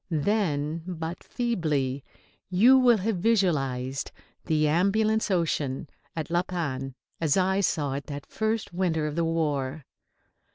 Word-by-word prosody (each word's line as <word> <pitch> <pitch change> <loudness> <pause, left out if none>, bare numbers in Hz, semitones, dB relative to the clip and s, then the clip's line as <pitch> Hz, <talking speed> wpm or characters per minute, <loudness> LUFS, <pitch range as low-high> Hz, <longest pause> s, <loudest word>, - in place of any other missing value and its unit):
Then, 160 -2 0
but 170 -1 -5
feebly, 150 - -1 0.5
you 220 +9 +6
will 245 -3 +5
have 210 +1 -1
visualised 140 - 0 0.4
the 155 -2 +2
Ambulance 215 +7 +2
Ocean 155 -6 0 0.3
at 160 -1 -4
La 175 0 +3
Panne 135 -8 -4 0.2
as 160 -1 +2
I 190 +1 +2
saw 150 -7 0
it 140 +1 -5
that 145 -1 -6
first 220 -3 -2
winter 170 -4 0
of 150 -1 -3
the 170 - +1
war. 150 -3 -1
165 Hz, 130 wpm, -27 LUFS, 145-190 Hz, 0.5 s, you